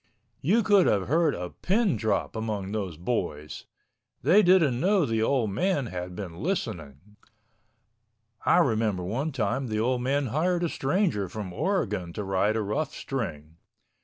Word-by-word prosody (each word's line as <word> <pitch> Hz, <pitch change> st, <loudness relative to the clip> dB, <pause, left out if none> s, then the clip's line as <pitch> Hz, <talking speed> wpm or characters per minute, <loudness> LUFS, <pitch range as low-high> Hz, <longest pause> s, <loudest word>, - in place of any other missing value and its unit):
You 215 Hz, -, +3 dB
could 200 Hz, -3 st, +5 dB
have 100 Hz, -2 st, +1 dB
heard 160 Hz, +1 st, +2 dB
a 90 Hz, 0 st, -5 dB
pin 200 Hz, -, +1 dB
drop 110 Hz, +1 st, -1 dB
among 105 Hz, -3 st, -3 dB
those 95 Hz, -7 st, -3 dB
boys. 75 Hz, -7 st, -3 dB, 0.6 s
They 205 Hz, +4 st, +6 dB
didn't 170 Hz, -10 st, +4 dB
know 190 Hz, 0 st, +3 dB
the 115 Hz, -2 st, 0 dB
old 115 Hz, -2 st, +1 dB
man 175 Hz, -, 0 dB
had 90 Hz, -4 st, -6 dB
been 90 Hz, -3 st, -7 dB
listening. 105 Hz, -, -4 dB, 1.3 s
I -, -, +4 dB
remember 110 Hz, -, +1 dB
one 125 Hz, -, -2 dB
time 130 Hz, +1 st, -1 dB
the 110 Hz, -1 st, -2 dB
old 125 Hz, +2 st, +1 dB
man 140 Hz, +3 st, 0 dB
hired 175 Hz, +3 st, +1 dB
a 170 Hz, -, +1 dB
stranger 135 Hz, -, 0 dB
from 95 Hz, -2 st, -6 dB
Oregon 100 Hz, -, -1 dB
to 105 Hz, -, -4 dB
ride 95 Hz, +2 st, +1 dB
a 110 Hz, -, 0 dB
rough 140 Hz, +9 st, -2 dB
string. 80 Hz, -, -5 dB
110 Hz, 155 wpm, -27 LUFS, 95-155 Hz, 1.3 s, They